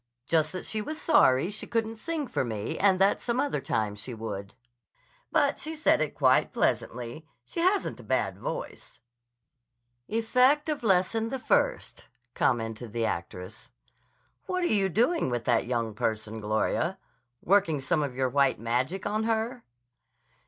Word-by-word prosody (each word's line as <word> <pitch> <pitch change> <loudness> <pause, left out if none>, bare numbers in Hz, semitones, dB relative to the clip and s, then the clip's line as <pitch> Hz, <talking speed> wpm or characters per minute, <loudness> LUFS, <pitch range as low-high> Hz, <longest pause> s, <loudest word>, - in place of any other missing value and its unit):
Just 155 -1 +2
that 185 - -5
she 215 - -2
was 310 +8 -5
sorry 135 - +4
she 210 - -8
couldn't 225 -1 -1
sing 315 +5 -3
for - - -1
me 110 -3 -3
and 195 -1 +4
that 195 +2 +3
some 240 +1 -1
other 285 - 0
time 105 -2 -1
she 110 +4 -7
would. 100 -2 -6 0.8
But 290 -3 +2
she 315 +1 -5
said 305 - +3
it 155 - -2
quite 130 -3 +3
pleasantly. 125 +6 -2 0.2
She - - -6
hasn't 375 +4 +1
a - - -11
bad - - -1
voice." - - -6 1.1
"Effect 255 +7 +3
of 300 -1 -1
Lesson 220 +2 +2
the 265 - -2
First," - - 0 0.3
commented 115 -3 -1
the 115 -1 0
actress. 90 +2 -5 0.8
"What 365 -1 -1
are 345 - +2
you 195 -2 +2
doing 240 - +2
with 120 -1 -2
that 120 -2 +2
young 115 -3 -1
person, 110 +1 -3
Gloria? 110 0 0 0.5
Working 170 -6 +3
some 135 +4 0
of 140 -4 -3
your 130 0 +1
white 140 -2 +2
magic 125 - -1
on 215 +2 0
her?" 230 +2 -1
170 Hz, 155 wpm, -28 LUFS, -, 1.1 s, sorry